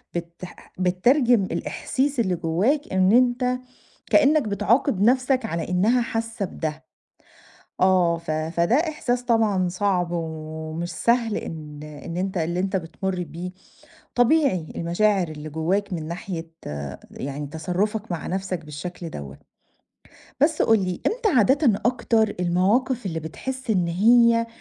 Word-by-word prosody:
بتح 170 +1 -8
بتترجم 235 +5 +3
الإحاسيس 270 +7 -2
اللي 185 -6 +1
جوّاك 190 - 0
إن 190 0 +4
أنت 250 +1 +3 0.5
كإنّك 300 +1 +5
بتعاقب 210 +3 +1
نَفْسك 255 +2 +3
على 170 -4 -3
إنّها 220 +8 +3
حاسّة 225 -2 -3
بده. 155 -2 -5 1.0
آه، 180 -3 +4
ف 165 -1 -5
فده 165 +6 +1
إحساس 270 -6 0
طبعًا 215 -6 +2
صعب 180 -2 0
ومش 160 0 -4
سهل 235 -2 +1
إن 150 -2 -7
إن 150 +3 -8
أنت 190 0 -2
اللي 170 +2 -1
أنت 195 +1 -1
بتمُُر 180 +1 -3
بيه، 175 +2 -7 0.6
طبيعي 245 - +3
المشاعر 180 +2 +1
اللي 155 0 -7
جوّاك 185 +6 -1
من 160 -2 -5
ناحية 170 -1 -5 0.6
يعني 140 +2 -5
تصرُّفك 185 +7 -2
مع 170 - -4
نَفْسك 185 -2 -3
بالشكل 165 +3 -7
دوّة. 70 -1 -8 1.0
بس 310 +1 +3
قُل 225 -2 +4
لي 185 -2 -3
إمتى 450 -1 +1
عادةً 245 0 +3
أكتر 235 -3 +2
المواقف 205 +8 +1
اللي 165 -4 -2
بتحس 260 +12 -6
إن 180 -5 +2
هي 230 +5 +4
190 Hz, 125 wpm, -24 LUFS, 170-235 Hz, 1.0 s, كإنّك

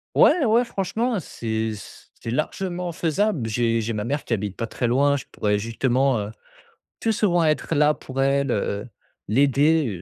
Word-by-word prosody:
Ouais, 350 - +5
ouais 235 +1 +3
franchement, 225 +2 -1
c'est 110 -7 -3
c 100 - -12 0.2
c'est 115 - -4
largement 175 +6 -2
faisable. 165 - 0
J'ai 115 +1 +1
j'ai 115 +1 -2
ma 105 -1 -2
mère 145 +4 -2
qui - - -1
habite 105 -3 -3
pas 115 - -2
très 120 - -2
loin. 140 +4 +3
Je 130 - -8
pourrais 105 -1 0
justement, 125 +4 +1
heu, 105 +1 -4 0.7
plus 225 - +1
souvent 185 -5 +2
être 155 +1 0
là 150 +1 +4
pour 135 0 -5
elle, 140 +1 +2
heu, 100 +2 -2 0.4
l'aider, 140 +6 +3
135 Hz, 175 wpm, -23 LUFS, 115-170 Hz, 0.7 s, Ouais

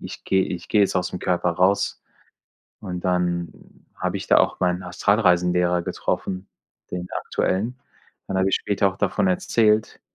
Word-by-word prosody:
Ich - - -9
gehe 95 -1 +2
ich 85 -2 -6
gehe 105 - +3
jetzt 100 -2 +2
aus'm 90 0 -2
Körper 90 -1 0
raus“ 95 +4 +1 0.8
und 90 -3 -5
dann 90 -2 0 0.4
habe - - -2
ich - - -6
da - - +6
auch - - +1
mein 90 0 +1
Astralreisenlehrer 90 -2 +2
getroffen, 95 +2 -3 0.4
den 90 0 -4 0.2
aktuellen. 115 +7 -1 0.5
Dann 95 - -1
habe 95 0 +2
ich 95 - +2
später 100 -1 +1
auch 95 - -7
davon - - 0
erzählt. 110 - +1
90 Hz, 155 wpm, -23 LUFS, 90-100 Hz, 0.8 s, da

